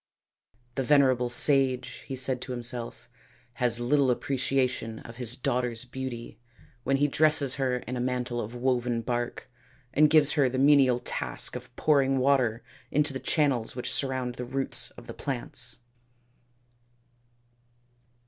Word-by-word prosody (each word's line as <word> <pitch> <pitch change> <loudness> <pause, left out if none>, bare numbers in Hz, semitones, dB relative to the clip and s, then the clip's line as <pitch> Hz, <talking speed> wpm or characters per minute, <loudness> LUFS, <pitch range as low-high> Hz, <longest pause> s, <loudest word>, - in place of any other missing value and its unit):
" 120 +2 -40
The - - +1
venerable 130 -3 +3
sage," 130 0 +2
he 135 - -4
said 130 -1 -1
to - - -7
himself, 120 -1 -5 0.2
" 120 +1 -33
has 120 -1 +4
little 135 +2 +2
appreciation 130 -3 -1
of 115 +1 -12
his 125 -1 -3
daughter's 125 -3 -2
beauty 125 -2 -7 0.4
when 135 +2 +1
he 145 +1 +2
dresses 150 -2 +3
her 130 -1 +1
in 125 0 -6
a - - -3
mantle 125 -1 -2
of 115 +3 -7
woven 120 -2 -1
bark 120 0 -3 0.5
and 150 +1 +5
gives 150 -1 +4
her 140 -4 +2
the 130 - -4
menial 135 -2 +5
task 65 - -1
of 125 0 -9
pouring 135 -3 +2
water 130 -4 +1 0.3
into 150 0 0
the 135 - -4
channels 135 -4 0
which 125 - -4
surround 130 -2 -2
the 125 - -4
roots 135 +2 -1
of - - -14
the - - -8
plants." 120 -3 +1
125 Hz, 150 wpm, -27 LUFS, 120-135 Hz, 0.5 s, and